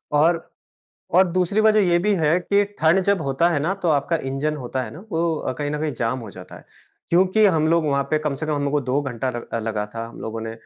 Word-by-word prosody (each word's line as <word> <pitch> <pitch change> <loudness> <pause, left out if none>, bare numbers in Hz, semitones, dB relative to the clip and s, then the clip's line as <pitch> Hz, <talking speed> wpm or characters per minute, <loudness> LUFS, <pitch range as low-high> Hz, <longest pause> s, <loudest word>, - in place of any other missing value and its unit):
और, 165 +3 +4 0.8
और 185 +2 +6
दूसरी 185 +3 +1
वजह 215 0 +5
ये 175 - +4
भी 210 -1 +3
है 160 0 +2
कि 200 +3 +2 0.2
ठंड 160 +4 +4
जब 200 -4 +2
होता 140 +4 +1
है 160 - +1
ना 170 +6 0
तो 175 - +1
आपका 150 +3 +1
इंजन 150 +3 -1
होता 130 -1 -4
है - - -6
ना, 155 - -10
वो 165 0 +1
अ, - - -3
कहीं 145 -1 -2
ना 150 - -2
कहीं 155 -1 -1
जाम 115 +2 -1
हो 110 -3 -9
जाता - - -11
है। - - -15 0.5
क्योंकि 185 +5 +4
हम 160 -5 +2
लोग 165 0 +2
वहाँ 140 -1 +1
पे 155 - +2
कम 150 -2 -2
से 155 +3 -5
कम 155 - 0
हमलोग 145 -1 -1
को 150 - +2
2 135 +1 0
घंटा 130 -1 -3
लग 120 -1 -7
अ, - - 0
लगा 110 -2 -2
था। 115 0 -4
हम - - -13
लोगों 110 0 -5
ने 110 0 -5
150 Hz, 265 wpm, -22 LUFS, 135-170 Hz, 0.8 s, और